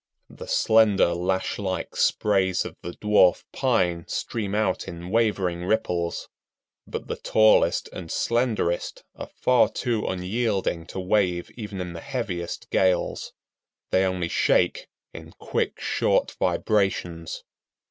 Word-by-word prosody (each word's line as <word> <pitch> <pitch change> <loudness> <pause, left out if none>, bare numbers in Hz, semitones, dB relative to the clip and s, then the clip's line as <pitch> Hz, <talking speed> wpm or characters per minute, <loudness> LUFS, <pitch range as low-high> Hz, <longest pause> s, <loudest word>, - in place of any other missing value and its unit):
The - - -10
slender 110 -5 +4
lash 95 +4 -1
like 95 -2 -3
sprays 95 -3 +2
of - - -7
the 85 - -6
Dwarf 105 -4 +3
Pine 90 -10 +1
stream 105 -3 -3
out 105 -4 0
in 85 +1 -7
wavering 100 -6 +1
ripples, 90 -4 -1 0.6
but - - -5
the - - -4
tallest 110 0 +3
and 85 -3 -7
slenderest 115 -8 -1
are - - -8
far 125 -1 +4
too 120 -4 -2
unyielding 95 -3 -1
to 95 - -6
wave 90 -2 0
even 105 -4 -7
in 90 -1 -5
the 85 - -7
heaviest 100 -11 -4
gales. 95 -2 +1 0.6
They 95 - +3
only 90 -2 -1
shake - - +1 0.3
in - - -10
quick, - - -3
short - - +1
vibrations. 90 -5 -1
95 Hz, 125 wpm, -25 LUFS, 90-110 Hz, 0.6 s, slender